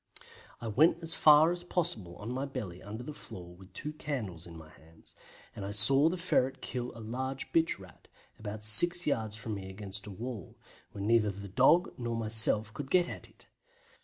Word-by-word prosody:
I 115 - -7
went 160 +10 +2
as 165 - 0
far 155 +2 +5
as 175 0 -4
possible 165 - -3
on 105 +6 -8
my 130 +2 -3
belly 105 -10 -7
under 110 +4 -8
the 150 - -8
floor 90 -10 -12
with 95 +1 -17
two 150 +10 -6
candles 110 - -6
in 85 -1 -11
my 80 -1 -14
hands, 80 +1 -20 0.4
and 100 - -7
I 100 - -5
saw 135 +9 +5
the 180 - -4
ferret 135 -7 0
kill 125 -1 -6
a - - -10
large 130 +4 -6
bitch 165 0 +1
Rat, 95 -4 -17 0.3
about 105 0 -7
six 175 +12 +7
yards 110 -7 -2
from 110 0 -6
me 95 -2 -7
against 100 +1 -8
a - - -8
wall, 115 -1 -8 0.3
where 100 - -7
neither 110 0 +2
the 100 +1 -8
dog 135 - +3
nor 120 -1 -3
myself 110 -1 +4
could 140 +1 -7
get 175 +1 +2
at - - -9
it. - - -21
115 Hz, 195 wpm, -30 LUFS, 100-145 Hz, 0.4 s, six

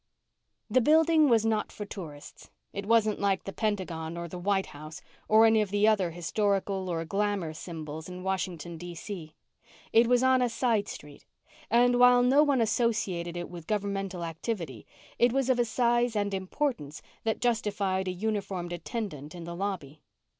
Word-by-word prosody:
The 255 - +3
building 315 +2 +5
was 225 -2 +4
not 220 -1 0
for 210 - -7
tourists. 160 -8 -10 0.2
It 200 0 -5
wasn't 220 -2 +3
like 195 -2 +1
the 195 - -6
Pentagon 175 -6 -2
or 170 0 -4
the 180 +2 -7
White 195 +1 +1
House 155 +2 -10 0.3
or 220 +1 +6
any 220 -1 +5
of 210 - -1
the 205 +2 +3
other 200 -5 +3
historical 190 +3 -1
or 165 -1 -2
glamour 195 -3 -1
symbols 160 -1 -7
in 180 0 -8
Washington, 175 -3 -3
D.C. 175 -1 -7 0.6
It 230 +1 +6
was 250 +1 +3
on 260 0 +4
a 245 - +2
side 230 -3 +1
street, 145 -1 -10 0.5
and 245 +2 +4
while 245 0 +7
no 265 +4 +5
one 285 -5 +3
associated 205 -7 0
it 175 - -4
with 170 -2 -10
governmental 195 -3 -2
activity, 165 - -5 0.3
it 240 0 +5
was 265 0 +1
of 250 - +1
a 240 - +3
size 240 0 +1
and 205 -1 0
importance 190 - -3 0.2
that 220 -1 -1
justified 205 -5 0
a - - 0
uniformed 195 -3 -3
attendant 175 - -5
in 175 - -7
the 170 +1 -6
lobby. 170 -7 -4
200 Hz, 170 wpm, -28 LUFS, 175-230 Hz, 0.6 s, while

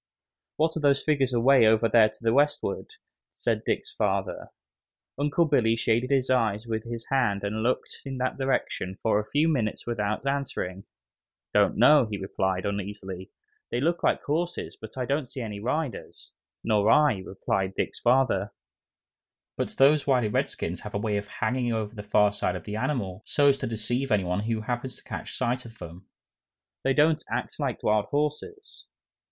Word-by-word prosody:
"What 160 +1 +1
are - - -1
those 140 -2 +3
figures 140 -4 +1
away 125 0 +5
over 110 +1 +4
there 110 0 +5
to - - -19
the 115 0 +2
westward?" 145 - 0 0.4
said - - -1
Dick's 430 - -2
father. - - -1 0.7
Uncle 145 +4 +2
Billy 120 -7 +3
shaded 115 +2 +1
his 135 -2 +2
eyes 110 -3 +1
with 110 -1 -3
his 115 -1 -6
hand 105 -7 +1
and 105 +2 -2
looked 120 +3 -1
in 135 -1 -5
that 130 0 -1
direction 130 -8 -1
for 110 0 +1
a 105 - -5
few 150 +3 +2
minutes 120 -9 -1
without 105 0 -2
answering. 125 -9 -3 0.7
"Don't 105 -1 +3
know," 125 +2 +6
he 105 - -3
replied, 95 -1 -2
uneasily. 100 -2 -5 0.4
"They - - -1
look 165 +5 0
like - - +1
horses, 170 +4 -2
but 110 +3 -11
I 130 - -1
don't 140 +1 -1
see 130 - -6
any 105 -3 -5
riders." 130 +5 -4 0.3
"Nor 105 -1 +2
I," 150 -9 +4
replied 95 0 -2
Dick's - - -2
father, 120 -6 +2 1.0
"but - - -2
those 145 +2 +5
wily 125 -5 +3
redskins - - -2
have - - -8
a - - +2
way 105 0 -1
of 100 0 -4
hanging 120 +2 -1
over 110 -1 -3
the 105 - -7
far 105 0 +3
side 105 - -1
of - - -6
the 105 - -5
animal 105 -7 -2
so's 140 -2 +3
to - - -2
deceive 120 +4 -2
any 105 -3 +3
one 90 +1 -1
who 110 +1 -2
happens 120 +3 -4
to - - -14
catch - - -7
sight 125 0 -1
of 115 -1 -13
them. 85 +2 -10 0.8
They 135 0 +2
don't 155 +1 +3
act - - -4
like - - -2
wild 105 -1 +2
horses." 150 - -3
115 Hz, 175 wpm, -27 LUFS, 105-140 Hz, 1.0 s, know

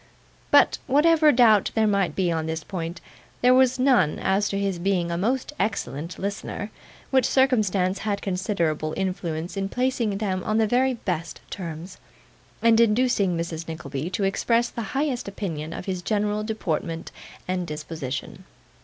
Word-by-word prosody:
But - - +5
whatever 305 +2 +5
doubt 225 -5 +5
there 220 -1 +3
might 200 -3 +1
be 180 -3 +1
on 160 -1 -1
this 160 0 -3
point, 170 -2 -5 0.4
there 250 +1 +6
was 260 0 +4
none 250 - +3
as 195 +2 +1
to 200 - -2
his 195 -3 -1
being 175 -2 0
a - - -1
most 255 +10 -1
excellent 170 - -2
listener; 200 +1 -4 0.4
which 260 -1 +4
circumstance 205 -8 +2
had 205 -2 -1
considerable 170 -6 -1
influence 175 -2 -3
in 195 0 -2
placing 245 -5 0
them 190 -3 -2
on 215 - 0
the 225 - +4
very 255 +4 +2
best 175 -6 -4
terms, 175 0 -7 0.6
and 230 -1 +5
inducing 215 -5 +3
Mrs 165 -1 -4
Nickleby 155 -1 -5
to 195 +2 -2
express 230 +5 +1
the 235 - -5 0.2
highest 275 -6 -1
opinion 165 -6 -4
of 175 - -6
his 185 -2 -3
general 210 +1 0
deportment 170 -6 -3 0.4
and 180 -1 -2
disposition. 150 -3 -6
195 Hz, 155 wpm, -25 LUFS, 170-225 Hz, 0.6 s, there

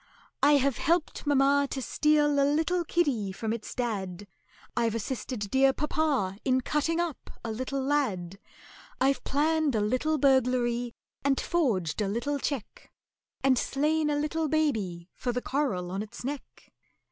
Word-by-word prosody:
"I 290 +1 +6
have 275 -2 +2
helped 330 -2 0
mamma 280 0 +4
to 270 - -3
steal 295 +1 +2
a - - +5
little 320 +5 +1
kiddy 280 - 0
from 220 +3 -3
its 230 -2 -6
dad, 205 -6 -3 0.5
I've 230 -2 +1
assisted 225 -2 -4
dear 270 0 +4
papa 280 -10 0
in 260 0 +2
cutting 305 +5 0
up 340 -5 -3 0.2
a 225 - -2
little 255 +4 -3
lad, 205 -11 -1 0.6
I've 270 +1 +2
planned 305 -1 +1
a - - +2
little 255 +9 +1
burglary 250 -3 +2 0.3
and 275 -1 +2
forged 215 - 0
a 205 - +1
little 240 +8 -1
cheque, 265 -6 -5 0.5
And 260 -2 +4
slain 300 +2 +1
a 295 - +1
little 305 +2 -1
baby 210 - -1
for 250 - -2
the 245 - -1
coral 245 -11 -1
on 195 +2 -2
its 215 +2 -8
neck!" 280 +2 -7
270 Hz, 150 wpm, -28 LUFS, 225-295 Hz, 0.6 s, I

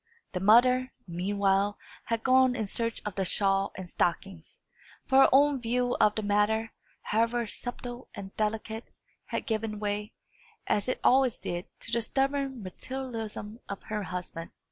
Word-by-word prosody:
The 180 - -2
mother, 250 +6 +5
meanwhile, 195 +3 +1 0.3
had 230 -1 -1
gone 260 -1 +5
in 225 -3 -1
search 230 +3 -2
of 210 - -3
the 195 - -1
shawl 195 +1 +1
and 185 -1 -6
stockings; 175 -1 -2 0.4
for 265 -1 +4
her - - +7
own 280 0 +5
view 245 +1 +1
of 210 - +5
the 215 - -2
matter, 210 +2 +2 0.3
however 230 +2 +1
subtle 245 +2 -6
and 195 -1 -8
delicate, 220 +1 -2 0.4
had - - -3
given 220 -1 -2
way, 210 +1 -2 0.5
as 205 - 0
it 255 - -1
always 260 -2 +4
did, 175 +1 -4 0.2
to - - -5
the 235 - +2
stubborn 270 0 -1
materialism 225 0 -6
of 200 - -5
her 215 -1 -1
husband. 180 -3 -5
220 Hz, 150 wpm, -29 LUFS, 200-245 Hz, 0.5 s, her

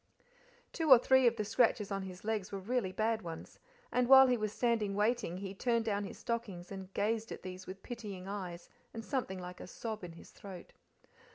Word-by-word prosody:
Two 325 -3 -1
or 260 - +11
three 260 +1 +5
of 235 - +3
the 215 - -2
scratches 220 -2 +2
on 195 0 -1
his 185 0 -8
legs 215 -3 -2
were 200 - -3
really 205 0 -1
bad 220 +3 0
ones, 165 -3 -8 0.3
and 250 -1 +2
while 265 0 +10
he 250 -1 +3
was 215 -3 -2
standing 220 -4 0
waiting 210 -4 +1
he 195 0 -5
turned 230 +2 0
down 205 -2 0
his - - -8
stockings 205 -7 -4
and 190 -1 -7
gazed 220 +2 0
at - - -7
these 185 0 -8
with 190 +1 -8
pitying 210 -6 -7
eyes 185 -4 -5 0.3
and 225 -1 -6
something 250 -9 -2
like 180 0 -8
a - - -8
sob 215 +2 -5
in 175 -2 -7
his 165 - -14
throat. 190 -3 -11
210 Hz, 205 wpm, -33 LUFS, 190-235 Hz, 0.3 s, or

